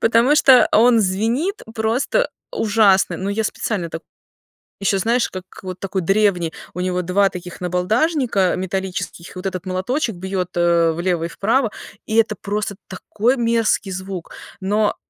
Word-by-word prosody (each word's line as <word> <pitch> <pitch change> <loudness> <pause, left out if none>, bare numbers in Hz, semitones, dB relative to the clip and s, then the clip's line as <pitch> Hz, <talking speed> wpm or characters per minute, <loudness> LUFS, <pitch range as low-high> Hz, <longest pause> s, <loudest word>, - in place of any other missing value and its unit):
Потому 230 +5 +4
что 265 -4 +6
он 230 +1 +5
звенит 230 - 0
просто 240 - 0 0.2
ужасно, 205 - +3
но 190 +2 -4
я 220 +2 -1
специально 190 -5 -2
так 165 - -6 0.8
Еще, 195 0 +2
знаешь, 235 +5 +1
как 185 -1 -7 0.2
вот 185 -1 -6
такой 195 -1 -2
древний, 185 -3 +1 0.2
у 180 - -6
него 180 0 -1
2 195 +3 +2
таких 180 0 -9
набалдашника 200 - +1
металлических, 185 -2 -4
и - - -13
вот 190 - -9
этот 185 -1 -3
молоточек 195 +5 -1
бьет, 185 0 -3
э, 170 -1 +3
влево 170 0 -1
и - - -1
вправо. 225 +5 0 0.4
И 220 - -1
это 220 -2 +3
просто 205 0 -2
такой 225 +7 -1
мерзкий 230 -4 +1
звук. 185 -2 -6 0.3
Но 205 +2 +1
195 Hz, 150 wpm, -20 LUFS, 180-225 Hz, 0.8 s, что